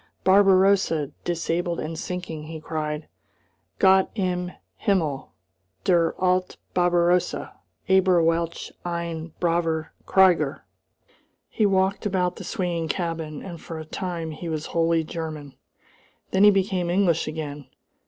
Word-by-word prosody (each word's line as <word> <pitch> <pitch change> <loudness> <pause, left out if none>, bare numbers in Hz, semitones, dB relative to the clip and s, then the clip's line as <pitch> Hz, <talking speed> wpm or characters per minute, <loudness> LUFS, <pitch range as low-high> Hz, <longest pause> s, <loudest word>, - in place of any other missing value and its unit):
"Barbarossa 190 -5 +4
disabled 170 0 -1
and 160 +1 -4
sinking," 165 -2 -5
he 160 0 -7
cried. 155 -1 -4 0.7
"Gott 190 -1 +5
im 180 -3 -1 0.3
Himmel! 165 - 0 0.5
Der 170 -2 +3
alte 185 0 +1 0.2
Barbarossa! 175 0 +2 0.3
Aber 190 -2 +4
welch 165 0 -1
ein 170 -2 -4
braver 165 -2 0
krieger!" 175 -7 +3 0.8
He 215 - +2
walked 190 +1 +1
about 180 -2 0
the - - -7
swinging 170 -3 -2
cabin, 165 -4 -3
and 170 -4 -8
for 165 - -7
a 155 - -7
time 170 -1 -4
he 165 +2 -6
was 155 -1 -3
wholly 165 -1 +2
German. 155 -4 -6 0.8
Then 190 +2 +5
he - - +10
became 190 -3 +1
English 175 -3 +2
again. 150 -2 -5
170 Hz, 120 wpm, -24 LUFS, 160-185 Hz, 0.8 s, he